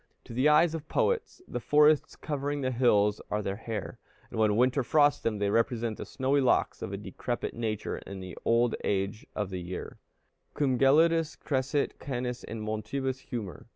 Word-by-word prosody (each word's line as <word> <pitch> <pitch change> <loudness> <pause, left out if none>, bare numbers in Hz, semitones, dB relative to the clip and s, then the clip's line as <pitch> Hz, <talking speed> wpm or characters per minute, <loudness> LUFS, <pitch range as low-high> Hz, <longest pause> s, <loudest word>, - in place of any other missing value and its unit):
To - - -10
the 130 +5 +3
eyes 155 +2 +5
of 160 -2 -6
poets, 460 -5 0
the - - -4
forests 150 +3 +4
covering 145 -1 -3
the 130 -1 0
hills 105 -4 +3
are 105 0 -1
their 100 0 -3
hair, 110 -3 -5 0.3
and - - -4
when 105 -1 +3
winter 130 +3 +3
frosts 145 +3 +3
them, 110 -2 -1
they 100 0 0
represent 115 0 0
the - - -6
snowy 135 +2 +1
locks 130 - +2
of - - -4
a - - -3
decrepit - - -4
nature 110 -3 -3
in 100 0 -8
the 95 -2 -8
old 115 +1 +3
age 100 +2 -1
of 105 -3 -2
the 90 -1 -4
year: 90 +1 -7 0.6
"Cum 130 -4 +1
gelidus 160 +4 +4
crescit 135 +1 -1
canis 125 -2 -4
in 110 -1 -6
montibus 110 +5 -3
humor." 110 - -6
125 Hz, 180 wpm, -29 LUFS, 105-145 Hz, 0.6 s, eyes